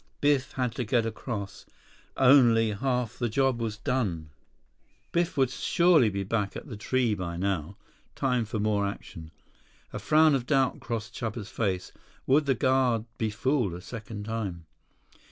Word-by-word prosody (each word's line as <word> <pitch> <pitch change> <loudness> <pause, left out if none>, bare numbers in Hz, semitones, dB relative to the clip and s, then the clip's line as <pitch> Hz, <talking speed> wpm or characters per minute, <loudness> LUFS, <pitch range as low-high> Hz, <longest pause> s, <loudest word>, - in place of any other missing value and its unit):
Biff 145 -2 +1
had 125 -2 -1
to 125 - 0
get 115 0 +1
across. 110 -3 -5 0.5
Only 120 -5 +5
half 125 +1 -2
the 120 -2 0
job 130 +1 +1
was 110 -2 -3
done. 105 - -2 0.8
Biff 175 +1 0
would 130 -2 +3
surely 165 -4 +3
be 100 -1 -3
back 100 0 -2
at - - -7
the 130 -8 -8
tree 120 +2 0
by 90 -4 -4
now. 95 -1 -2 0.4
Time 125 -3 0
for 110 +1 -4
more 105 -1 +1
action. 85 -5 -8 0.6
A - - -4
frown 155 0 +4
of 130 -3 -1
doubt 135 -3 +2
crossed 115 -1 -5
Chuba's 110 -2 -5
face. 95 -5 -2 0.3
Would 145 +2 +3
the 135 - +3
guard 125 -3 +2
be 110 - 0
fooled 115 - 0
a - - -7
second 110 0 -7
time? 100 -7 -4
115 Hz, 155 wpm, -28 LUFS, 105-130 Hz, 0.8 s, Only